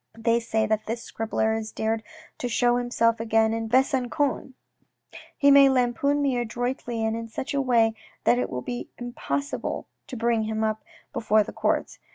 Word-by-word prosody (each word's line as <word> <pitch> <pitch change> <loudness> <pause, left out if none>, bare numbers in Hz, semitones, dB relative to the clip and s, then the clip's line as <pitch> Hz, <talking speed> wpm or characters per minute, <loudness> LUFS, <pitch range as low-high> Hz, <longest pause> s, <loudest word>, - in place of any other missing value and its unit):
They 230 +1 +2
say 220 -1 0
that 215 0 -1
this 230 +1 -3
scribbler 220 0 -1
has 220 0 -4
dared 220 0 -1 0.4
to 245 - -2
show 240 +1 +2
himself 230 -2 +1
again 225 0 +2
in 225 0 -3
Besangon. 265 0 +1 0.8
He 280 0 +5
may 275 -1 +8
lampoon 265 +3 +1
me 260 -3 +1
adroitly 240 -1 -2
and 220 0 0
in 230 0 -5
such 245 +5 -5
a 280 - +1
way 230 -4 +3 0.3
that 245 - +4
it - - -1
will 125 -1 -4
be 245 -1 -5
impossible 245 +3 -3 0.2
to 255 - -7
bring 230 -1 +1
him 220 0 -2
up 215 0 -1 0.3
before 215 -1 +3
the - - -9
courts. - - -1
235 Hz, 175 wpm, -25 LUFS, 220-250 Hz, 0.8 s, may